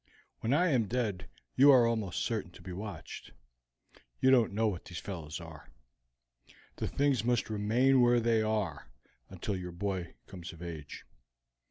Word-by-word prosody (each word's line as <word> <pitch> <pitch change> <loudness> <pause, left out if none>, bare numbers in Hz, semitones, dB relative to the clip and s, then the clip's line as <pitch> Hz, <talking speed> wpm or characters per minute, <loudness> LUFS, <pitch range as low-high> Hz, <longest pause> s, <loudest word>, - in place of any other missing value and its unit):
When 115 - -1
I 170 +6 +3
am 120 -8 +2
dead 105 -5 -2 0.3
you 140 +3 +7
are 130 -4 +7
almost 110 -6 -1
certain 110 -6 -2
to - - -14
be 95 - -7
watched. 100 +3 -8 0.9
You 130 - +4
don't 120 -5 +4
know 110 +2 +1
what 95 -5 -3
these 90 - -8
fellows 80 -5 -6
are. 80 -3 -11 1.1
The - - -2
things 140 -5 +1
must 120 -2 0
remain 120 +6 +3
where 120 0 +5
they 115 -1 +2
are 105 - -2 0.4
until 95 +2 -4
your 90 -1 -5
boy 90 -1 -4
comes 90 -3 -9
of 85 +1 -11
age. 80 -4 -8
105 Hz, 160 wpm, -31 LUFS, 90-120 Hz, 1.1 s, you